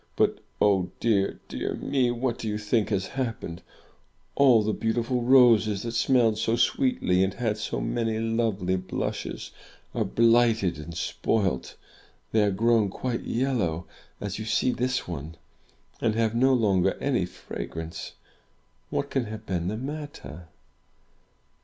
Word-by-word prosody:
But, - - +2 0.2
oh 95 -3 +3
dear, 100 -4 +1
dear - - -3
me! 130 -3 +1
What 120 0 -1
do 110 - -4
you 105 0 -1
think 105 +1 0
has 95 -3 0
happened? 110 -9 -4 0.7
All 125 -6 +5
the 110 +1 0
beautiful 120 +2 0
roses, 115 -5 +5
that 115 - -3
smelled 115 -2 +3
so 110 +1 +1
sweetly 245 - +2
and 95 +1 -1
had 110 -2 -1
so - - -3
many 115 -2 -1
lovely 110 -5 0
blushes, 95 0 -4 0.4
are - - 0
blighted 115 -6 +3
and 80 +2 -8
spoilt! 95 -3 -1 0.6
They 110 - +3
are 105 - +3
grown 110 +1 +2
quite 120 +4 -3
yellow, 110 -10 -1 0.3
as 100 0 -4
you 110 - -4
see 120 +3 +2
this 125 +1 -1
one, 80 -1 -6 0.6
and 110 -2 +1
have 115 -1 +1
no 130 +3 +4
longer 100 -6 +2
any - - 0
fragrance! 80 0 -7 0.8
What 140 - -2
can 135 -3 0
have 110 0 -8
been 90 -3 -2
the 105 +3 -2
matter?" 140 - -7
110 Hz, 140 wpm, -26 LUFS, 95-120 Hz, 0.8 s, All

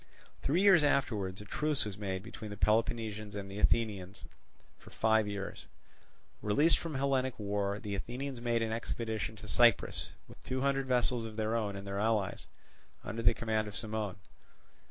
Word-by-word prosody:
Three 170 +8 +2
years 190 -6 +7
afterwards 105 -10 +1
a - - -10
truce 150 +5 0
was 105 -2 -4
made 95 -2 -3
between 110 -1 -8
the 105 - -7
Peloponnesians 110 -1 0
and 100 -1 -5
Athenians 100 -2 0 0.6
for - - -14
five 110 -1 +2
years. 100 -1 -5 0.7
Released 145 +11 +4
from 165 -3 -5
Hellenic 130 -2 +1
war, 100 -1 -1
the 105 -1 -5
Athenians 125 +5 -4
made 120 -1 +1
an 110 - -2
expedition 110 -3 -3
to 105 0 -11
Cyprus 120 +1 +3 0.2
with - - -15
two 130 +2 -3
hundred 135 -1 +1
vessels 125 -1 +2
of 110 -1 -6
their 110 +1 0
own 105 -3 -1
and 100 0 -7
their 100 0 -3
allies, 105 -3 0 0.6
under 115 +2 -4
the 95 - +5
command 110 -1 0
of 105 - -6
Cimon. 110 -3 -2
110 Hz, 165 wpm, -32 LUFS, 105-120 Hz, 0.7 s, years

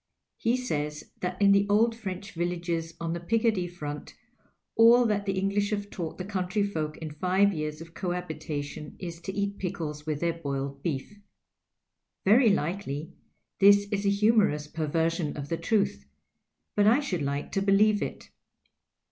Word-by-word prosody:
He 235 +2 +1
says 150 -11 -3
that 180 0 -3
in 200 -1 +6
the 200 0 +4
old 225 +3 +4
Freneh 200 -2 -6
villages 170 -1 -2
on 165 0 -2
the 170 - -3
Picardy 220 0 +1
front 150 -4 -7 0.6
all 235 +2 +7
that 205 -2 0
the 195 -1 0
English 200 +1 +1
have 205 -1 -3
taught 165 -3 -5
the 185 - -5
countryfolk 185 -5 -1
in 160 -2 -6
five 185 +6 +2
years 155 -1 -4
of 165 0 -11
cohabitation 155 -5 -4
is 170 -2 -7
to 190 - -4
eat 200 +1 -2
pickles 160 -5 -4
with 150 -2 -1
their 170 0 +1
boiled 140 -3 -4
beef. 165 +7 -4 1.1
Very 225 +4 +6
likely 165 -4 -2 0.5
this 200 +1 +7
is 200 -1 0
a 200 - +3
humorous 200 -7 +3
perver 160 +1 0
sion 165 -4 -3
of 145 0 -6
the 165 - -1
truth; 195 - 0 0.7
but 205 0 +4
I 235 +6 +6
should 190 - -2
like 140 +1 -2
to 195 - 0
believe 205 +1 +4
it. - - -5
180 Hz, 160 wpm, -28 LUFS, 155-205 Hz, 1.1 s, all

